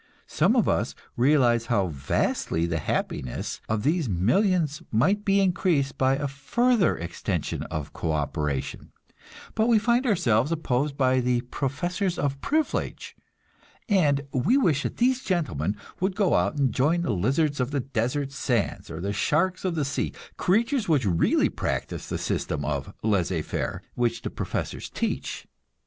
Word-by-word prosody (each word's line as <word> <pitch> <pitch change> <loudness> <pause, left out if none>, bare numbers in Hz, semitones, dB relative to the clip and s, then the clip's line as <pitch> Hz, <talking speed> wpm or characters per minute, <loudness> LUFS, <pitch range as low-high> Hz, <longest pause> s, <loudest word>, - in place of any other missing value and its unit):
Some - - +2
of - - +3
us - - 0 0.2
realize 120 -3 +3
how 100 -6 +1
vastly 75 +3 -1
the 85 -1 -1
happiness 65 -3 -3
of 110 -1 0
these 155 -1 +1
millions 150 - +2
might 190 - +2
be 200 0 +3
increased 175 -7 +1
by 130 0 +2
a 145 +1 -2
further 230 - +1
extension 85 +1 -3
of 75 -2 -5
co 80 - -2
operation; 75 -2 -2 0.6
but 220 +1 +2
we 235 -2 +5
find 240 +4 +2
ourselves 130 - +2
opposed 145 -3 -1
by 130 -1 +3
the 125 -1 +1
professors 170 +9 -2
of 140 -1 -1
privilege 310 +2 -1 0.7
and 155 - +3
we 170 - +3
wish 160 - +2
that - - -4
these 255 +2 +2
gentlemen 105 - -1 0.2
would 190 +1 0
go 200 -4 +2
out - - +1
and 135 -5 +2
join 160 +6 +2
the 145 - 0
lizards 135 - +1
of 125 0 0
the 140 -1 -1
desert 130 +3 -2
sands 125 -5 -1
or 80 0 -6
the 100 +2 -2
sharks 175 - +1
of 185 -3 -1
the 150 -3 0
sea, 140 0 -2 0.2
creatures 230 +4 +1
which 145 -7 +3
really 85 -4 +3
practice - - -3
the - - -2
system - - -2
of - - -2
"laissez 95 -6 +1
faire" - - -3
which 120 -1 -1
the - - -3
professors - - -4
teach. - - -3
140 Hz, 155 wpm, -26 LUFS, 110-180 Hz, 0.7 s, we